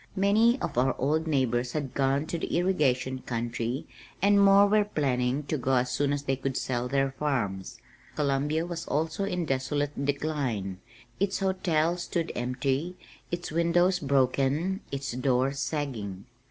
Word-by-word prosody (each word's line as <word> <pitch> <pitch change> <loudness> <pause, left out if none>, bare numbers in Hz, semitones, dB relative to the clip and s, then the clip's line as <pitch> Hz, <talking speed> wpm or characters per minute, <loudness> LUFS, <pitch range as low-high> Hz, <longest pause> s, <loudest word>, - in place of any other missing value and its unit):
Many 220 +6 +4
of - - -1
our 130 +1 +2
old 155 +5 0
neighbors 125 -4 +1
had 145 -4 -3
gone 140 +2 +1
"to 170 +1 -3
the - - -1
irrigation 135 -8 +1
country" 120 +1 -3 0.3
and 200 +1 +5
more 200 0 +7
were 210 +1 +4
planning 135 -7 0
to 150 +1 -2
go 130 +2 +1
as 125 0 +1
soon 140 +3 +1
as 145 0 -1
they 135 -1 0
could 135 0 -3
sell 125 -1 -1
their 135 +1 +1
farms. 120 -10 -2 0.4
Columbia 150 +2 0
was 170 -1 -5
also 160 +6 -1
in 180 -3 -2
desolate 145 +1 -1
decline. 135 -10 -2 0.4
Its 195 0 +1
hotel 180 -4 +1
stood 170 -1 -2
empty, 130 +7 -1 0.3
its 175 -1 -4
windows 175 +3 +3
broken, 140 +6 +1
its 140 0 -3
doors 130 +2 +1
sagging. 115 -12 -3
140 Hz, 150 wpm, -28 LUFS, 130-170 Hz, 0.4 s, more